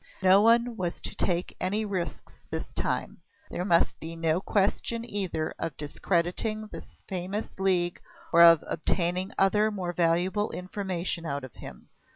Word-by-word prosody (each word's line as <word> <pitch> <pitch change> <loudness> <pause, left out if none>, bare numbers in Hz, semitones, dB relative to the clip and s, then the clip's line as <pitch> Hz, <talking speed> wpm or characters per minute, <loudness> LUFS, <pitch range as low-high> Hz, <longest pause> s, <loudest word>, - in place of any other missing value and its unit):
No 190 +2 +7
one 230 +1 +4
was 175 -2 -3
to - - -5
take 175 0 -1
any 205 +4 0
risks 185 -4 -5
this - - -5
time; - - -2 0.3
there 180 - -2
must 170 -3 +2
be 165 +1 -7
no 165 +1 +1
question 215 +4 0
either 185 -8 -2
of 165 -4 -4
discrediting 180 +8 -1
his - - -11
famous 190 +3 -4
League 180 -2 +1 0.3
or 170 - +7
of 170 -2 +8
obtaining 180 +4 0
other 210 +2 +3
more 185 -4 -3
valuable 180 +5 +1
information 180 -2 -3
out 140 -3 -3
of 130 -4 -9
him. - - -11
185 Hz, 150 wpm, -28 LUFS, 170-205 Hz, 0.3 s, of